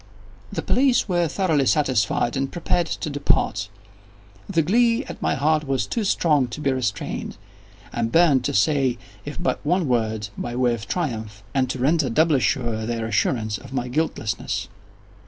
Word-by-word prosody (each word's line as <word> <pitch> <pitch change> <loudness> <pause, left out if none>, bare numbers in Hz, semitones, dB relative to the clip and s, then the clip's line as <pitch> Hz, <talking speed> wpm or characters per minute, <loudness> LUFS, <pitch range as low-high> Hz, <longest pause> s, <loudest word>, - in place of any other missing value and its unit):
The - - -3
police 255 -3 +3
were 175 -3 +1
thoroughly 155 -5 +1
satisfied 125 -4 +1
and 135 0 -1
prepared 175 0 0
to 160 - -4
depart. 110 -8 +1 0.8
The 165 -5 +2
glee 230 - +3
at - - -9
my - - +1
heart 150 +2 +1
was 130 -5 0
too 230 - -2
strong 150 -8 +2
to 120 - -7
be 140 -2 +1
restrained. 125 -6 -3 0.6
I 120 - -2
burned 135 +3 +4
to - - 0
say 130 +3 +2 0.3
if 145 +3 -6
but 175 - -1
one 175 +1 +1
word, 110 -4 0
by 120 0 -4
way 125 -1 +2
of 110 -1 -6
triumph, 110 - -3
and 130 -2 +1
to 130 - -2
render 140 +2 +2
doubly 155 +3 +3
sure 115 -4 0
their 115 -1 -2
assurance 110 -1 0
of 130 - -12
my 125 -1 -2
guiltlessness. 130 -6 -2
135 Hz, 165 wpm, -23 LUFS, 115-160 Hz, 0.8 s, burned